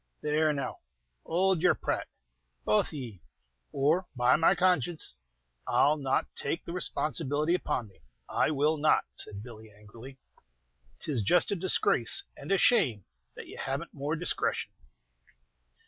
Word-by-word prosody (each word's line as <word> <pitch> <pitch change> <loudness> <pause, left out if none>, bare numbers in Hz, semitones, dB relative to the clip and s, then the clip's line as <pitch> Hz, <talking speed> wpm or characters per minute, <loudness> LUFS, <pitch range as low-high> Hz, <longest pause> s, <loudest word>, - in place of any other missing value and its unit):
"There, 155 +1 +2
now, 140 -3 -4 0.5
hould 185 0 +2
your 180 - +4
prate, - - -3 0.6
both 105 - +3
of - - -8
ye, 120 - -8 0.5
or, 155 +7 +1
by 125 0 +4
my 165 - +4
conscience, 175 - +1 0.5
I - - +3
'll 150 +1 +2
not 135 -2 0
take 160 +4 -3
the 170 - -6
responsibility 155 -3 0
upon 150 -9 -1
me, 95 -5 -22 0.3
I - - +1
will 150 +1 +1
not!" 150 +1 +3
said 100 0 -5
Billy, 110 -2 -12
angrily. 115 +6 -13 0.8
"'Tis 135 -7 -1
just 170 - +3
a - - +1
disgrace 170 - +2
and 140 - -8
a 195 - +4
shame 150 - +3 0.3
that - - -9
ye - - -11
haven't 140 +5 -4
more 145 +2 -3
discretion." 175 +2 -1
150 Hz, 145 wpm, -29 LUFS, 125-170 Hz, 0.8 s, your